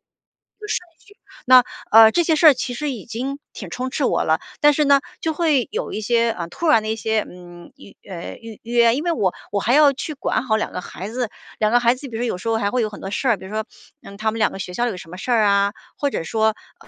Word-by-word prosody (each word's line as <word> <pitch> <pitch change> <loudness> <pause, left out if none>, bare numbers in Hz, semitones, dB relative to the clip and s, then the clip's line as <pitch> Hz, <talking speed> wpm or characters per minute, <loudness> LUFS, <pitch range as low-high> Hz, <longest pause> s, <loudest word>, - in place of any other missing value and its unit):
序 - - -63 1.5
那， 255 -1 +8 0.3
呃， 220 0 +8
这 345 - +3
些 320 -1 +2
事 335 - +3
儿 300 - +9
其 250 0 -4
实 290 +4 -3
已 235 -6 -8
经 260 +5 -5
挺 195 - -9
充 250 +9 -4
斥 275 0 -1
我 - - +1
了， 160 +1 +1 0.2
但 295 0 +6
是 300 +1 +1
呢， 280 -1 +5 0.2
就 320 -1 -2
会 300 -6 +1
有 - - -3
一 - - -3
些 235 +2 +1
呃， 170 -5 -5
突 335 - -4
然 300 -8 +5
的 215 - -6
一 220 - -1
些 220 -1 -1
嗯， 175 -1 -13
预 - - -16
呃， 175 -2 -7
预 225 -2 -11
约， 235 0 +3
因 295 - -3
为 345 - 0
我 195 - 0 0.2
我 200 - 0
还 235 - +1
要 295 0 +6
去 285 +3 -5
管 275 - -1
好 220 -4 +1
2 220 - -2
个 - - -5
孩 185 +2 -8
子， 245 -1 -3 0.3
2 215 0 +1
个 245 - +6
孩 235 +1 +4
子 270 +2 -9
比 230 - -8
如 230 - -3
说 245 - 0
有 180 - -2
时 185 - -8
候 225 - +1
还 200 -2 0
会 250 -1 +1
有 215 - -1
很 205 - -11
多 195 - -5
事 260 +5 -2
儿， 225 -4 +3
比 - - -11
如 190 - -10
说， 215 0 -2 0.4
嗯， 200 - -11
他 215 +1 -1
们 225 - -5
2 215 - +2
个 195 - -8
学 180 0 -6
校 240 +6 0
有 220 - -3
什 170 -2 -11
么 180 - -9
事 245 +6 -4
儿 225 -2 +4
啊， 200 0 +3 0.2
或 285 - 0
者 165 - -3
说， 220 +4 +1 0.2
呃 - - -18
225 Hz, 290 characters per minute, -21 LUFS, 205-260 Hz, 1.5 s, 儿